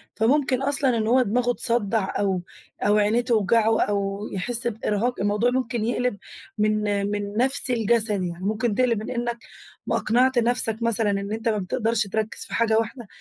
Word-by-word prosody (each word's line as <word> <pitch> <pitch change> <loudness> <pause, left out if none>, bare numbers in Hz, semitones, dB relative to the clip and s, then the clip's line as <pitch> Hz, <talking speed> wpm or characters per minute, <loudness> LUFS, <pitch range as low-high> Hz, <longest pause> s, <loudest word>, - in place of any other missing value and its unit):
فممكن 260 +3 +2
أصلًا 270 -3 +1
إن 220 0 -1
هو 255 +2 +4
دماغه 245 +2 +1
تصدّع 220 -5 -1
أو 190 -3 0 0.4
أو 205 +1 +3
عينيه 210 +3 +2
توجعه 225 -1 +2
أو 200 -1 -1
يحِس 235 +5 0
بإرهاق، 225 +2 -1
الموضوع 210 +4 +1
ممكن 240 -3 -1
يقلِب 245 -2 -1 0.4
من 215 0 +1 0.3
من 205 0 -4
نفسي 260 0 +1
لجسدي. 210 -4 +2
يعني 170 +2 -8
ممكن 215 +1 0
تقلِب 240 -4 +2
من - - -6
إنّك 240 -1 -2 0.5
ما - - +1
أقنعت 250 +3 +2
نفسك 230 -2 +1
مثلًا 230 -2 +1
إن 200 +1 -3
أنت 225 +1 -1
ما 215 - 0
بتقدرش 220 +2 -1
تركّز 220 +2 -3
في - - -9
حاجة 220 -1 +2
واحدة، 230 0 -5
225 Hz, 170 wpm, -24 LUFS, 205-245 Hz, 0.5 s, هو